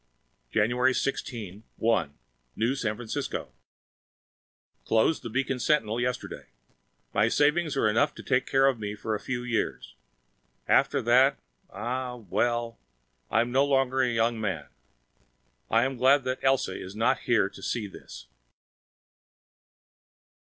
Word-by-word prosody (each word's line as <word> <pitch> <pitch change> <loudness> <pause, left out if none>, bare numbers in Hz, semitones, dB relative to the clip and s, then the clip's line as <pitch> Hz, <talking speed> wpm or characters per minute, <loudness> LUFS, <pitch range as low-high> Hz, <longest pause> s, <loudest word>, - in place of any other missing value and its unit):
January 125 - +2
16, 110 -7 -3 0.2
1 110 -11 +1 0.4
New 115 +4 +1
San 110 -6 -2
Francisco 115 -1 -5 1.3
Closed 115 +8 +2
the 115 - -6
Beacon 135 +2 -1
Sentinel 115 -3 +1
yesterday. 125 0 -4 0.7
My 105 +2 +3
savings 150 +4 +2
are 120 - +3
enough 130 +8 +2
to - - -10
take 125 0 +1
care 135 0 +3
of 135 -4 +2
me 105 -1 -4
for 110 +1 -3
a 105 - -2
few 120 +1 -4
years. 120 -2 -2 0.7
After - - +3
that 130 +4 +4 0.3
ah, 125 +1 -4
well, 120 +2 -1 0.5
I 110 - +3
am 120 +1 -2
no 135 +2 +4
longer 135 -2 +2
a 130 - +2
young 115 -1 0
man. 95 -9 -2 1.0
I 115 +1 +4
am 135 0 -2
glad 135 +3 +4
that 130 +1 -3
Elsa 135 -8 +2
is 95 +2 -8
not 115 +1 +2
here - - +4
to - - -14
see 120 -3 -2
this. 95 -9 -11
120 Hz, 135 wpm, -27 LUFS, 110-130 Hz, 1.3 s, that